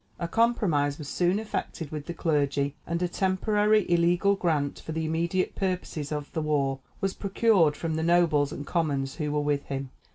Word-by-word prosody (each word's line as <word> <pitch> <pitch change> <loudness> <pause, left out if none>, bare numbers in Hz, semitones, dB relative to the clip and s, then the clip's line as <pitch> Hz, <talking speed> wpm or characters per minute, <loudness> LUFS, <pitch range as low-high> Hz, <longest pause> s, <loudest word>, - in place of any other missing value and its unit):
A 170 - -3
compromise 170 -10 +2
was 150 - -7
soon 180 +5 +1
effected 195 -7 -4
with 150 -1 -6
the 170 - -3
clergy, 145 -3 0
and 170 0 -1
a - - +2
temporary 210 +3 +2
illegal 175 +3 +3
grant 155 -7 0
for 160 - -6
the 160 0 -2
immediate 170 +3 0
purposes 180 -6 -3
of 150 -1 -4
the 160 - -1
war 140 -3 0 0.2
was 195 0 0
procured 195 -7 +2
from 165 +1 -2
the - - -1
nobles 160 -4 +3
and 145 -3 -6
commons 140 -6 -1
who 150 -3 -2
were 150 0 +1
with 145 -1 0
him. 135 -1 -4
160 Hz, 185 wpm, -27 LUFS, 145-185 Hz, 0.2 s, illegal